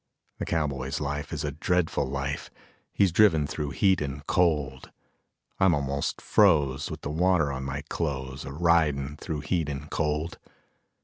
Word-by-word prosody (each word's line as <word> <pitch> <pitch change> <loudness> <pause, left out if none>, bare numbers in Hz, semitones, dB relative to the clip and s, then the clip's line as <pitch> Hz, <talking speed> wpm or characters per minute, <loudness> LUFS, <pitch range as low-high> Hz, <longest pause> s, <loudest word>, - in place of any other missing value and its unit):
The - - -2
cowboy's 70 -5 -1
life 75 0 -3
is 75 -2 -3
a 75 - -2
dreadful 85 0 0
life, 70 +1 -3 0.4
He's 100 -3 +3
driven 90 -5 +5
through 75 0 -3
heat 95 +3 +2
and 70 0 -4
cold; 75 -8 +1 0.7
I'm 95 -3 +5
almost 70 0 -2
froze 75 -9 +3
with - - -7
the 70 - -4
water 85 -2 +2
on 65 -1 -4
my 70 +2 -4
clothes, 65 -5 -3
A 70 - -7
ridin' 75 -3 +2
through 75 -1 -4
heat 75 +2 -1
and 70 +1 -6
cold. 75 +1 -1
75 Hz, 150 wpm, -27 LUFS, 70-85 Hz, 0.7 s, driven